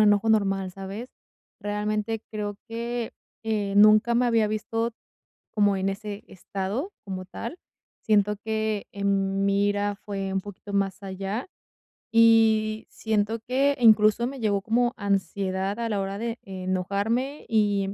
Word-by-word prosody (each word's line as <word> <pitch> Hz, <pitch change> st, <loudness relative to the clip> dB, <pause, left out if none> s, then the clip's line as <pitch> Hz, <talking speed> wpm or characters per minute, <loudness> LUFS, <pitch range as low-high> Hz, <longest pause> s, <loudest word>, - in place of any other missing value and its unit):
enojo 210 Hz, +1 st, +4 dB
normal, 195 Hz, -3 st, +2 dB
¿sabes? 195 Hz, +6 st, -7 dB, 0.5 s
Realmente, 210 Hz, +1 st, -2 dB
creo 205 Hz, -1 st, -4 dB
que, 235 Hz, +1 st, -3 dB, 0.3 s
eh, 210 Hz, -3 st, -1 dB
nunca 215 Hz, +3 st, +6 dB
me 245 Hz, +1 st, +3 dB
había 225 Hz, -2 st, +3 dB
visto 225 Hz, +2 st, -1 dB, 0.6 s
como 205 Hz, -2 st, +3 dB
en 190 Hz, +1 st, 0 dB
ese 205 Hz, +1 st, -6 dB
estado, 200 Hz, -, -4 dB
como 185 Hz, -2 st, -5 dB
tal. 235 Hz, -, -7 dB, 0.4 s
Siento 210 Hz, -1 st, +2 dB
que 220 Hz, -2 st, -1 dB
en 195 Hz, -1 st, 0 dB
mi 200 Hz, 0 st, +3 dB
ira 205 Hz, 0 st, 0 dB
fue 195 Hz, -2 st, -4 dB
un 195 Hz, -, 0 dB
poquito 205 Hz, +1 st, -10 dB
más 195 Hz, 0 st, 0 dB
allá. 195 Hz, +4 st, -4 dB, 0.7 s
Y 220 Hz, -1 st, +4 dB
siento 220 Hz, +1 st, -1 dB
que 275 Hz, +3 st, +2 dB
incluso, 215 Hz, 0 st, +6 dB
me 270 Hz, +2 st, -5 dB
llevó 205 Hz, -3 st, +1 dB
como 240 Hz, +3 st, +1 dB
ansiedad 195 Hz, 0 st, -1 dB
a 230 Hz, -, -1 dB
la 205 Hz, -2 st, 0 dB
hora 195 Hz, 0 st, -3 dB
de 230 Hz, +2 st, -3 dB
enojarme 200 Hz, +8 st, -2 dB
y 205 Hz, -3 st, +2 dB
210 Hz, 135 wpm, -26 LUFS, 195-225 Hz, 0.7 s, nunca